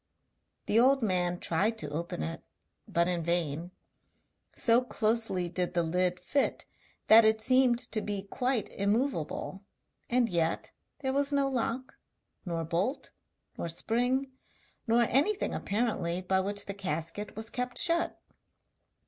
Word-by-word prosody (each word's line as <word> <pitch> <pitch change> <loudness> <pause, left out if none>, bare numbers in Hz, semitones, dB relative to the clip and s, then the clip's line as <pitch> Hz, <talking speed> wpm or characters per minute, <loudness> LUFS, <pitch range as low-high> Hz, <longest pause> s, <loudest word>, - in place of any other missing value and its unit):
The 220 - +3
old 265 +1 +4
man 180 -3 0
tried 205 +7 0
to 150 - -5
open 160 - -3
it, 80 - -4 0.5
but 170 0 +1
in 175 -1 0
vain 170 -1 0 0.9
so 235 +1 +4
closely 220 -6 0
did 180 +1 -2
the 170 - +3
lid 180 +2 0
fit 280 -1 -1 0.4
that 225 +1 +8
it 220 0 +4
seemed 255 +1 +3
to 215 - -1
be 205 -2 -3
quite 245 +3 -1
immovable, 200 - -1 0.5
and 245 -1 +3
yet 170 -5 -1 0.3
there 265 -1 -1
was 280 +1 +1
no 280 -1 +2
lock, 255 0 -2 0.5
nor 165 -1 -2
bolt, 185 - -2 0.5
nor 170 - -3
spring, 245 +9 0 0.6
nor 235 +1 +4
anything 300 - +1
apparently 200 -5 -1
by 190 +1 +1
which 200 +1 -1
the 200 - -4
casket 175 +1 -4
was 220 +1 -2
kept 250 0 -3
shut. 340 0 +2
210 Hz, 135 wpm, -30 LUFS, 175-250 Hz, 0.9 s, that